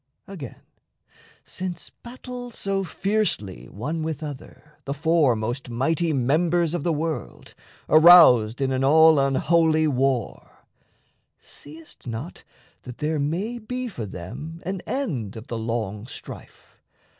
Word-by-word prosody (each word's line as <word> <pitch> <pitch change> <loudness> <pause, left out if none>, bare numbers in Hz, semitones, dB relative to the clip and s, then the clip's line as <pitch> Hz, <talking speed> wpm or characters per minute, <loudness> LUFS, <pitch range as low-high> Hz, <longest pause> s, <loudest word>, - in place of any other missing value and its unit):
Again, 170 - -9 0.8
since 180 -2 -6
battle 245 0 -9
so 195 -4 -2
fiercely 190 - -1
one 150 +11 -4
with 155 -1 -4
other 150 +1 -10
The 140 - -3
four 155 -4 +3
most 120 +4 -4
mighty 160 +8 0
members 160 +5 +1
the 175 0 -1
world, 160 +1 -4 0.3
Aroused 155 -9 +7
in 135 -1 +1
an 130 0 0
all 160 +2 +6
unholy 155 +3 +2
war, 135 -3 -2 0.7
Seest 155 -1 -14
not 120 +9 -6 0.4
that 125 -2 -10
there 155 0 -1
may 185 +12 -2
be 250 +3 -4
for 120 - -6
them 125 - -8
an 190 0 -3
end 135 - -3
Of 110 0 -9
the 115 - -3
long 110 -2 -3
strife? - - -12
155 Hz, 120 wpm, -24 LUFS, 125-175 Hz, 0.8 s, Aroused